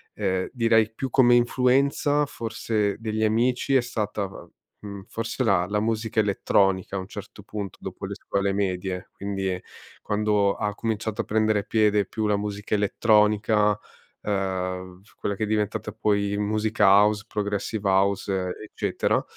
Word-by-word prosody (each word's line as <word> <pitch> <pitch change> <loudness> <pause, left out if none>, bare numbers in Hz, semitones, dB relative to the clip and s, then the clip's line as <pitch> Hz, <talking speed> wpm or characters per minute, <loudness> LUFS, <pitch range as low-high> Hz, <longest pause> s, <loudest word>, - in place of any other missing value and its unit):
uhm, 95 -1 -1
direi 115 -3 +3
più 130 +3 -4
come 120 -1 +5
influenza, 135 +4 +2
forse 110 -5 -2
degli 110 -1 -2
amici 125 +5 +1
è 130 - +5
stata, 105 -4 -3 0.5
mhmm, 100 -2 -8
forse 115 +3 -3
la 95 -5 +3
la 105 +2 0
musica 110 0 -1
elettronica 95 -2 +1
a - - -1
un 95 - -7
certo - - -10
punto, 100 -3 -6
dopo - - -6
le - - -5
scuole 100 0 -1
medie. 95 -2 -2
Quindi, 95 -2 -3 0.4
quando 105 -1 +1
ha 105 -1 -2
cominciato 110 -1 -3
a - - -7
prendere 110 -1 +1
piede 105 -2 +2
più 110 +3 -3
la 105 -1 +2
musica 105 0 -4
elettronica, 105 0 +3 0.5
uhm, 95 -2 -3 0.2
quella 100 - -2
che 110 - -3
è - - 0
diventata 105 0 -1
poi 100 -1 0
musica 105 +1 +1
house, 105 +2 +5
progressive 105 -1 -2
house, 95 -1 +1
eccetera 110 - -1
105 Hz, 145 wpm, -25 LUFS, 100-110 Hz, 0.5 s, come